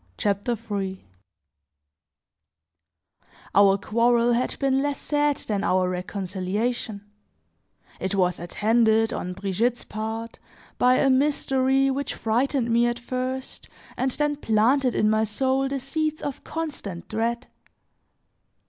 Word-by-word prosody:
CHAPTER 205 +4 0
III 190 -2 -3 2.5
OUR 200 -1 +6
quarrel 235 +3 +2
had 245 +2 -1
been 270 -1 +1
less 285 0 -1
sad 295 -1 +1
than 205 -2 -2
our 185 -2 +2
reconciliation; 200 +4 -3 1.0
it 190 +2 -2
was 180 -2 +1
attended, 220 +5 +2
on 180 - -4
Brigitte's 205 +6 -1
part, 220 +1 -5 0.4
by 250 0 +5
a 270 - +3
mystery 270 -1 +2
which 280 +1 -3
frightened 240 +2 0
me 235 +1 +4
at 240 0 -1
first 255 +2 -4 0.3
and 260 - 0
then 295 +2 -1
planted 250 +2 +2
in 215 - +3
my 215 0 +3
soul 265 +5 0
the 275 0 -2
seeds 310 +4 -2
of 285 -2 -5
constant 285 - -5
dread. 235 +3 -2
235 Hz, 115 wpm, -25 LUFS, 205-265 Hz, 2.5 s, OUR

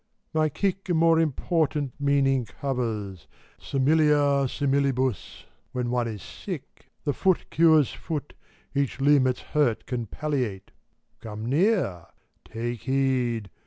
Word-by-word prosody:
My 155 -1 +2
kick 195 +5 -2
a 175 - +2
more 165 0 +4
important 155 -2 0
meaning 135 -3 +2
covers: 110 - -4 0.3
Similia 145 -1 +3
similibus, 135 - 0 0.3
when 125 -1 -2
one 120 -1 0
is 105 -6 -6
sick. - - -8 0.2
The 145 - 0
foot 190 +3 +1
cures 160 -4 +4
foot, 150 -3 -5 0.4
each 140 -1 -1
limb 140 -1 +4
its 125 - -1
hurt 145 -7 0
can 120 -3 -3
palliate; 125 -8 -3 0.5
Gome 110 0 -7
near! 145 - +1 0.4
Take 120 +1 -4
heed! 130 -6 0
135 Hz, 120 wpm, -26 LUFS, 120-150 Hz, 0.5 s, more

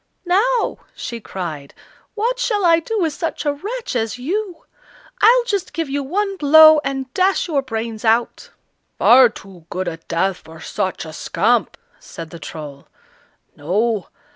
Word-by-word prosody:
"Now," 450 +8 +1 0.2
she 235 - -6
cried, 160 -9 -7 0.4
"what 475 +4 -1
shall 425 -6 0
I 335 -1 +5
do 445 +7 -4
with 325 -5 0
such 330 0 -4
a 290 - +1
wretch 425 - -5
as 225 0 -1
you? 360 +7 -4 0.6
I'll 480 +3 +6
just 405 -6 -3
give 325 -4 -3
you 285 +1 -1
one 390 +8 -2
blow, 310 0 +7
and 270 -1 -4
dash 380 +1 +1
your 295 -5 0
brains 225 -3 -5
out!" 230 +1 +1 0.5
"Far 250 0 +7
too 190 -6 -14
good 185 +1 -3
a 165 -1 -4
death 175 +3 -1
for 160 +1 -14
such 185 +1 -3
a 160 - -9
scamp," 215 +7 0 0.2
said 165 -1 -10
the 170 - -9
Troll. 145 -4 -9 0.7
"No! 205 +7 -1
265 Hz, 155 wpm, -19 LUFS, -, 0.7 s, blow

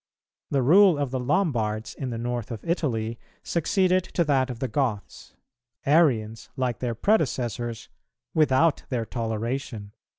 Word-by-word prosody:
[278:1] - - -5
The - - +3
rule 180 +4 +6
of 140 -3 -2
the 130 - -1
Lombards 120 - 0
in 135 - -5
the 115 - -4
north 120 -1 -3
of 115 -3 -7
Italy 115 -10 -1 0.2
succeeded 185 +2 +1
to 175 - -1
that 135 -4 +1
of 125 - -5
the 130 +2 -2
Goths, 115 -4 -3 0.5
Arians, 125 -8 +2
like 125 -2 -1
their 120 -2 -2
predecessors, 120 - 0 0.5
without 155 0 +3
their 120 -3 -1
toleration. 115 -1 -4
125 Hz, 140 wpm, -25 LUFS, 115-150 Hz, 0.5 s, rule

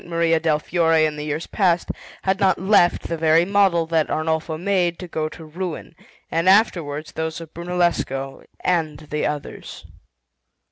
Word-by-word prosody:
Maria 165 -1 +1
del 160 -2 +2
Fiore 165 0 +2
in 155 -1 -2
the 150 - -5
years 150 +2 -3
past 180 -4 +1 0.3
had 190 0 +1
not 190 -1 +3
left 190 -2 +3
the 170 - -3
very 160 +1 +4
model 195 -4 +3
that 160 -1 0
Arnolfo 160 0 -1
made 180 -1 0
to 180 - -8
go 155 -2 -2
to 160 0 -11
ruin, 170 +1 -6 0.4
and 165 +3 +2
afterwards 165 -7 +2
those 160 0 -4
of 165 -2 -11
Brunellesco 170 -6 -2 0.2
and 160 -4 -1
of 150 - -17
the 150 0 0
others. 150 -1 -7
165 Hz, 160 wpm, -22 LUFS, 155-180 Hz, 0.4 s, very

